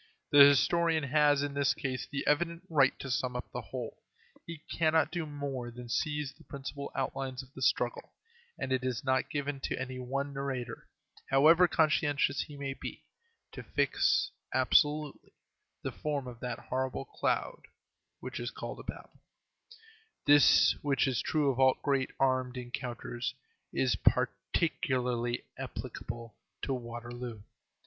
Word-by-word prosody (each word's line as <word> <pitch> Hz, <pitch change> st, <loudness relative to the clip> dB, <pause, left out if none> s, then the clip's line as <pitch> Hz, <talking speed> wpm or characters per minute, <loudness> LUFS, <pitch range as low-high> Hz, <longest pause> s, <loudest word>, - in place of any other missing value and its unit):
The 145 Hz, -, +7 dB
historian 160 Hz, +3 st, +6 dB
has, 145 Hz, 0 st, +3 dB
in 145 Hz, -1 st, -2 dB
this 140 Hz, -1 st, +2 dB
case, 130 Hz, -4 st, -3 dB
the 140 Hz, -1 st, -4 dB
evident 170 Hz, +3 st, +1 dB
right 135 Hz, -4 st, +4 dB
to 135 Hz, -, -5 dB
sum 125 Hz, 0 st, -1 dB
up 125 Hz, -, -5 dB
the 125 Hz, -, -4 dB
whole. 115 Hz, +2 st, -7 dB, 0.5 s
He 165 Hz, -3 st, -8 dB
cannot 160 Hz, 0 st, +2 dB
do 170 Hz, -3 st, -3 dB
more 140 Hz, -4 st, -4 dB
than 120 Hz, 0 st, -10 dB
seize 150 Hz, +2 st, -1 dB
the -, -, -19 dB
principal 140 Hz, 0 st, -6 dB
outlines 130 Hz, -1 st, -3 dB
of 130 Hz, +1 st, -19 dB
the 130 Hz, -, -10 dB
struggle, 120 Hz, -1 st, 0 dB, 0.5 s
and 130 Hz, -, -4 dB
it 130 Hz, -1 st, +1 dB
is 125 Hz, -3 st, -2 dB
not 130 Hz, -1 st, +1 dB
given 145 Hz, -1 st, -2 dB
to -, -, -3 dB
any 130 Hz, 0 st, -4 dB
one 135 Hz, +3 st, -3 dB
narrator, 130 Hz, -4 st, -4 dB, 0.4 s
however 160 Hz, +6 st, +6 dB
conscientious 145 Hz, -3 st, +2 dB
he 145 Hz, -, -8 dB
may 135 Hz, -1 st, -3 dB
be, -, -, -8 dB, 0.5 s
to -, -, -7 dB
fix, -, -, +1 dB, 0.2 s
absolutely, 150 Hz, -1 st, +2 dB, 0.5 s
the -, -, -2 dB
form 145 Hz, -3 st, -3 dB
of 120 Hz, -2 st, -8 dB
that 125 Hz, -1 st, -3 dB
horrible 130 Hz, +3 st, -3 dB
cloud -, -, -2 dB, 0.5 s
which -, -, -5 dB
is -, -, -3 dB
called -, -, -7 dB
a -, -, -8 dB
battle. -, -, -9 dB, 1.0 s
This, 145 Hz, 0 st, +7 dB
which 140 Hz, -3 st, +2 dB
is 130 Hz, -3 st, 0 dB
true 150 Hz, -3 st, +2 dB
of 130 Hz, -, -5 dB
all 130 Hz, -1 st, +5 dB
great 135 Hz, -2 st, +1 dB
armed 130 Hz, -1 st, +1 dB
encounters, 120 Hz, -1 st, -4 dB, 0.4 s
is -, -, +1 dB
particularly 125 Hz, -7 st, 0 dB, 0.2 s
applicable 115 Hz, -2 st, -6 dB, 0.3 s
to 135 Hz, -, 0 dB
Waterloo. 120 Hz, -2 st, -6 dB
135 Hz, 145 wpm, -31 LUFS, 125-145 Hz, 1.0 s, The